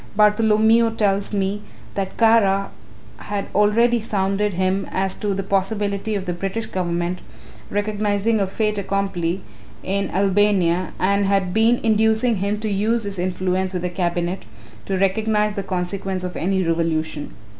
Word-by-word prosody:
Bartholomew 220 +2 +4
tells 200 -1 +1
me 200 0 -1 0.3
that 195 -1 -4
Kara 205 -4 +3 0.5
had 205 -1 -4
already 230 +4 +3
sounded 205 -1 -1
him 185 +2 0
as 190 0 0
to 205 -2 -2
the 195 - -2
possibility 200 +2 -1
of 195 -2 -3
the 175 - -2
British 195 +5 -3
Government 175 0 -2 0.5
recognising 205 +1 0
a 195 - +1
fait 210 +1 -1
accompli 195 -2 -2 0.4
in 200 +1 -1
Albania 190 -2 +2
and 200 +1 +2
had 195 -2 +1
been 225 +2 +3
inducing 220 +1 +2
him 200 +2 -1
to 220 - -2
use 215 +3 0
his 200 -2 -5
influence 185 +1 -1
with 180 -1 -3
the 180 - -2
Cabinet 175 0 -1 0.5
to 195 - 0
recognize 210 +2 +1
the 200 - -3
consequence 190 0 -3
of 180 0 -5
any 190 +1 0
revolution. 160 -3 -1
195 Hz, 145 wpm, -21 LUFS, 185-210 Hz, 0.5 s, Bartholomew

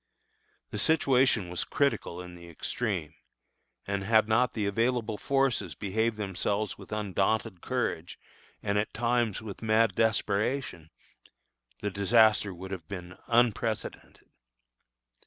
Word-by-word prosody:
The - - -3
situation 130 - +3
was 90 - -2
critical 115 -11 -1
in 90 0 -10
the 85 -1 -12
extreme; 85 -2 -3 0.7
and 100 -1 -2
had 110 +1 +4
not 115 +3 +2
the 105 -3 -1
available 115 +1 0
forces 130 - 0
behaved 110 +4 -1
themselves 100 +1 -1
with - - -14
undaunted 105 -1 -1
courage - - -2 0.5
and, 100 0 +1
at 105 - -3
times, 115 -3 0
with 105 -3 -8
mad 110 0 +3
desperation, 110 - 0 0.9
the 105 - -2
disaster 105 +1 +4
would 95 +1 -9
have 90 -5 -6
been 90 -2 -7
unprecedented. 115 -2 0
110 Hz, 120 wpm, -29 LUFS, 95-115 Hz, 0.9 s, had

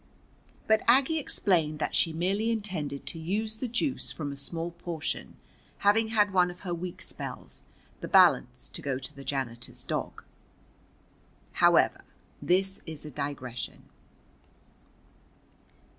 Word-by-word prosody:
But 220 0 +4
Aggie 270 +6 +5
explained 170 - +1
that 150 - -2
she 165 - +3
merely 195 +7 0
intended 185 -11 -2
to 165 - -5
use 215 +7 -1
the 255 - -3
juice 245 +4 -1
from 145 -3 -4
a - - -6
small 165 +5 -1
portion, 170 -2 -4 0.4
having 215 +2 +4
had 210 -3 +2
one 180 -1 +4
of 175 +1 -10
her 180 -3 -3
weak 175 +1 -5
spells, - - -7 0.4
the - - -5
balance - - +4
to - - -6
go 135 -2 -1
to 135 +3 -8
the 140 - -9
janitor's 130 -4 -4
dog. - - -3 1.3
However, - - +4 0.4
this 190 +2 +2
is 155 -2 -7
a 150 - -7
digression. 130 -3 -5
175 Hz, 130 wpm, -29 LUFS, 150-210 Hz, 1.3 s, Aggie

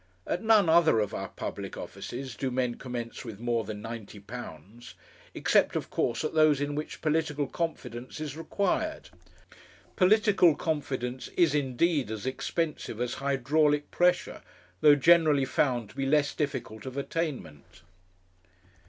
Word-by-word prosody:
At 180 - -2
none 220 -4 +5
other 160 -7 +5
of 105 -2 -1
our - - -4
public - - -6
offices 130 0 -7
do 135 - -2
men 125 -1 0
commence 120 -2 -6
with 110 -5 -8
more 120 -1 0
than 105 0 -7
£90 115 -2 -9 0.4
except, - - +2
of - - -3
course, 120 - 0
at 155 - -2
those 155 -3 +4
in 145 0 -2
which 150 +1 -5
political 155 -2 0
confidence 130 -6 -5
is 150 -2 -5
required. 200 - -2 0.8
Political 195 -4 +4
confidence 130 -5 -3
is 170 -5 +4
indeed 145 -1 +1
as 110 0 -5
expensive 145 -2 -3
as 125 0 -1
hydraulic 145 +2 +1
pressure, 180 0 +1 0.4
though 145 +4 +7
generally 155 -2 +5
found 125 -4 0
to - - -20
be 135 -1 -1
less 145 0 +2
difficult 135 -5 -4
of 130 +1 -7
attainment. 130 - -5
140 Hz, 135 wpm, -28 LUFS, 120-160 Hz, 0.8 s, though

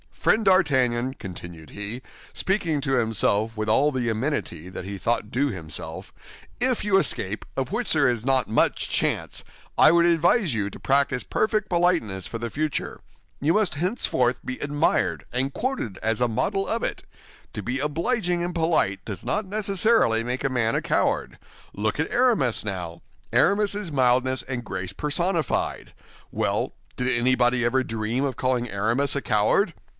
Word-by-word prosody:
Friend 220 -1 +1
D'Artagnan," 130 -9 +3
continued 85 -6 -9
he, 105 +5 -6 0.3
speaking 180 -6 0
to 135 -1 -1
himself 110 -2 +1
with 110 0 -2
all 140 +7 +3
the 130 -3 -2
amenity 110 - -2
that 95 0 -7
he 100 0 -6
thought 110 +1 -1
due 135 +4 +1
himself, 80 - -7 0.5
"if 250 -1 +2
you 200 -2 +3
escape, 110 - -1
of 135 +4 -2
which 235 +3 +1
there 145 -4 +4
is 120 -3 -2
not 130 -4 +2
much 110 - +1
chance, - - 0 0.4
I - - +8
would 170 0 +4
advise 170 - +3
you 105 -3 -1
to - - -11
practice 135 -2 +1
perfect 215 -1 0
politeness 170 - +1
for 115 - -5
the 115 0 -5
future. 155 +2 -3 0.4
You 155 +4 +2
must 210 -7 +1
henceforth 145 - 0
be 130 - -4
admired 145 +2 0
and 130 +3 -1
quoted 245 - -3
as 110 +1 0
a 125 - +4
model 195 - 0
of 225 +1 0
it. - - -3 0.5
To 105 - -5
be 125 +6 -2
obliging 175 - 0
and 175 0 -3
polite 160 - +1
does 100 -5 -7
not 215 0 0
necessarily 200 - +2
make 125 +2 -3
a 135 - +1
man 120 -3 +1
a - - -1
coward. - - 0 0.4
Look 105 +6 -2
at 160 - -1
Aramis, 235 - +2
now; 90 -5 -5 0.3
Aramis 205 0 +3
is 205 -5 -4
mildness 130 -1 +2
and 130 -2 -4
grace 95 -4 -5
personified. 160 - -1 0.4
Well, - - -1 0.2
did 125 - -2
anybody 125 0 +2
ever 130 +2 +2
dream 115 +3 -2
of 135 -2 -2
calling 125 -2 0
Aramis 115 +8 0
a 140 - -1
coward? 120 - +2
130 Hz, 165 wpm, -24 LUFS, 115-170 Hz, 0.5 s, I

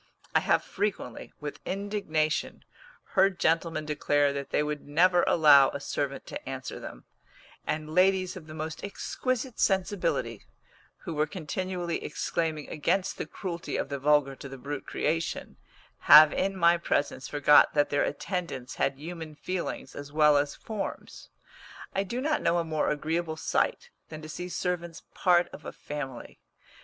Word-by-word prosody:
I - - +5
have - - +2
frequently, 200 - -3
with 150 -1 -6
indignation, 190 -6 -2 0.5
heard 195 -2 +3
gentlemen 165 -1 +1
declare 145 -1 +1
that 140 -1 -5
they 150 - +1
would 150 -1 -4
never 175 +4 +4
allow 145 -4 +7
a 140 - -5
servant 140 0 -3
to - - -7
answer 130 -1 -6
them; - - -9 0.6
and 155 0 -3
ladies 185 +1 +3
of 165 -4 -10
the 155 - -9
most 160 0 -5
exquisite 255 +4 -3
sensibility, 190 -1 0 0.6
who 170 - -5
were 155 0 +1
continually 180 +1 -3
exclaiming 160 -3 -2
against 180 +5 -1
the - - -3
cruelty 170 -3 -5
of - - -2
the 140 -1 -3
vulgar 145 -1 +3
to 140 - -9
the 135 - -8
brute 140 +2 -6
creation, 165 +1 -2 0.4
have 155 -1 +9
in 195 0 -1
my 170 -1 +5
presence 145 -5 -1
forgot 145 +1 +5
that 145 -1 +2
their 145 - +2
attendants 170 -7 -4
had - - +1
human 160 0 -7
feelings 175 -5 -4
as 145 0 -8
well 150 -1 +5
as 145 0 +1
forms. 215 -3 -6 0.6
I 195 - +1
do 215 +6 -3
not 300 +2 0
know 170 - +2
a 170 - +1
more 155 -2 0
agreeable 160 +2 -2
sight 485 - -1 0.2
than 155 -1 -8
to 155 - -8
see 180 +3 -6
servants 175 -2 -3
part 175 -1 +3
of - - -11
a - - -6
family. 135 -4 -7
160 Hz, 155 wpm, -28 LUFS, 145-185 Hz, 0.6 s, have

